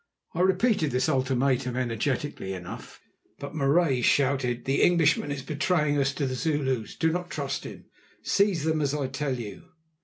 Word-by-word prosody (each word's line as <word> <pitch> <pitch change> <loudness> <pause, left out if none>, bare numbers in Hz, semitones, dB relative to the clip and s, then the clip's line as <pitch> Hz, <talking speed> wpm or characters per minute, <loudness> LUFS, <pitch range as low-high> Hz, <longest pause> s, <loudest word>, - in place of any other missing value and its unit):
I 165 - -4
repeated 190 - +2
this 125 -1 0
ultimatum 130 -1 +1
energetically 125 -3 -2
enough, 90 -2 -9 0.4
but 140 +1 -7
Marais 140 -2 +2
shouted: 130 -2 +1
"The 135 +1 +1
Englishman 160 -4 +3
is 140 -2 -4
betraying 150 -1 +1
us 135 0 +2
to 140 - -1
the 130 - -2
Zulus! 130 -5 -1
Do 160 0 +1
not 175 +1 -3
trust - - -3
him; - - -9 0.4
seize 200 -6 +2
them 160 -1 +1
as 145 0 0
I 145 -2 -1
tell 130 0 -2
you." 105 - -8
140 Hz, 160 wpm, -27 LUFS, 130-160 Hz, 0.4 s, Englishman